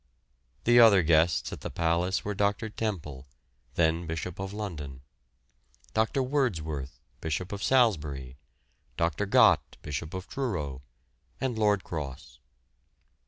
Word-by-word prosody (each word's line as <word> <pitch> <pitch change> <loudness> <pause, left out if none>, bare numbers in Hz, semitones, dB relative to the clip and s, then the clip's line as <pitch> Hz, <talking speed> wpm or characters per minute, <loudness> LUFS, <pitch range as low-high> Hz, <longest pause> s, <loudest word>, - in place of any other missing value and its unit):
The 120 +1 +6
other 105 -6 +7
guests 80 +1 +3
at - - -8
the - - -4
Palace 85 +3 0
were 105 - -1
Dr. 105 +2 0
Temple, 75 - -4 0.5
then 85 0 +1
Bishop 80 +2 -4
of 95 0 -4
London; 75 -11 -6 0.9
Dr. 110 +5 +1
Wordsworth, 80 - -2 0.2
Bishop 80 +3 -3
of 100 -1 -5
Salisbury; 75 - +1 0.6
Dr. 85 +3 0
Gott, - - +4
Bishop 80 +4 -5
of 95 0 -6
Truro; 80 - -3 0.6
and 130 -3 -1
Lord 105 -3 +2
Cross. 75 -7 -7
90 Hz, 115 wpm, -28 LUFS, 75-105 Hz, 0.9 s, other